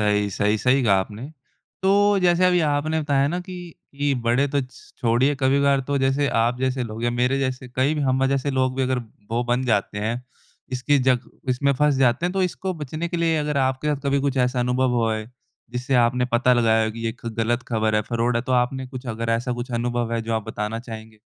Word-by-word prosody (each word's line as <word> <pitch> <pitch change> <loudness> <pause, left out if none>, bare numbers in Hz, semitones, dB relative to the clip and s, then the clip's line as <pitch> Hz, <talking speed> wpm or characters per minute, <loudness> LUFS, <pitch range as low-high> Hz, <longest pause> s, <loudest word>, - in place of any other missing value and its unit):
सही, 105 -1 +2
सही, 105 +2 +1
सही 130 +3 +3
कहा 100 -3 +4
आपने। 105 +4 -7 0.6
तो 200 +1 +4
जैसे 175 0 +4
अभी 180 -1 +3
आपने 155 +1 0
बताया 140 -2 +1
ना 175 +4 -2
कि 185 - -6 0.4
इ 145 0 0
बड़े 120 +4 +2
तो 145 0 0
छोड़िए, 130 +2 0
कभी-कभार 140 +1 +3
तो 145 - 0
जैसे 135 +2 +1
आप 120 +2 0
जैसे 130 0 0
लोग 115 0 -6
या 120 - +2
मेरे 125 +3 +1
जैसे 130 -1 -3
कई 135 +4 +2
भी 150 - -2
हम 130 -1 +2
जैसे 140 +1 0
लोग 130 -1 0
भी 135 - +1
अगर 130 0 0 0.3
वो 120 +1 0
बन 125 +2 0
जाते 105 -3 0
हैं, 115 +4 -2 0.5
इसकी 135 +3 +2
जक 125 -2 +1 0.2
इसमें 140 +2 +2
फँस 150 +2 +2
जाते 130 +4 +2
हैं, 180 - -2
तो 195 - 0
इसको 185 +1 -2
बचने 155 +2 -4
के 175 - -3
लिए 165 -1 +1
अगर 150 -1 -1
आपके 130 +3 -2
साथ 140 - -8
कभी 140 0 +2
कुछ 140 -1 -1
ऐसा 125 0 +1
अनुभव 125 +1 +1
हुआ 115 -2 +1
है, 110 +2 -7 0.4
जिससे 125 +2 -2
आपने 125 +1 0
पता 125 +2 +4
लगाया 110 -2 +3
हो 110 - -1
कि 115 +1 -7
ये 115 - -1
ख - - -10
गलत 120 +2 0
खबर 110 -2 0
है, 105 - +2
फ्रॉड 115 +2 0
है 120 - 0
तो 130 - -3
आपने 130 +2 0
कुछ 130 0 -9
अगर 115 0 -3
ऐसा 120 +2 -1
कुछ 120 +1 -5
अनुभव 120 0 -1
है, 115 -1 -1
जो 115 0 -2
आप 110 -2 -2
बताना 105 +1 -3
चाहेंगे? 110 -2 -10
130 Hz, 230 wpm, -23 LUFS, 115-140 Hz, 0.6 s, कहा